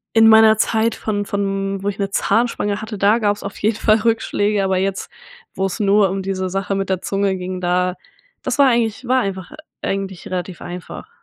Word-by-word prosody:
in 225 0 +7
meiner 220 0 +7
Zeit 225 0 +2
von 205 -2 -3
von 195 -1 -2
wo 200 - -4
ich 200 - -5
'ne 200 -1 -2
Zahnspange 205 -2 0
hatte, 215 -2 -6
da 205 +3 +4
gab's 205 -2 0
auf 200 0 -7
jeden 215 +1 0
Fall 215 -1 +3
Rückschläge, 210 -2 +1
aber 190 -1 +1
jetzt, 195 +1 -2 0.5
wo's 190 -1 -2
nur 195 -2 +2
diese 185 -1 -3
Sache 195 +1 -2
mit 195 0 -2
der 190 -1 -1
Zunge 195 -1 0
ging, 185 0 -5
da 180 0 0 0.5
das - - -2
war 280 - +7
eigentlich 235 -1 0
war 255 +1 +3
einfach 190 -4 -5 0.3
eigentlich 195 -2 -4
relativ 180 -1 -5
einfach. 180 - -8
200 Hz, 185 wpm, -19 LUFS, 190-220 Hz, 0.5 s, in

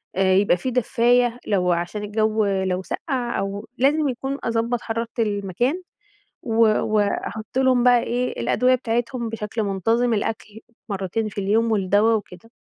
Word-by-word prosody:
آآ 190 0 +3
يبقى 190 -1 +3
في 255 +8 -3
دفاية، 245 0 +2
لو 180 -3 +1
عشان 175 +5 -2
الجو 215 +1 0
لو 190 -2 0
سقَّع 250 - -3
أو 200 +2 -4
لازم 290 +3 +2
يكون 270 +2 -3
أضبّط 230 0 -1
حرارة 230 +1 -3
المكان، 215 - -1 0.6
و 225 -2 -3 0.3
وأحط 215 +2 -1
لهم 260 -2 +3
بقى 245 -1 +5
إيه 245 - -2
الأدوية 235 - +2
بتاعتهم 235 0 -2
بشكل 220 0 -4
منتظم، 225 +5 +1
الأكل 215 0 -4 0.3
مرتين 200 +2 -2
في 205 - -10
اليوم، 220 +4 +1
والدوا 205 +2 +3
وكده. 205 0 -6
225 Hz, 140 wpm, -22 LUFS, 200-245 Hz, 0.6 s, بقى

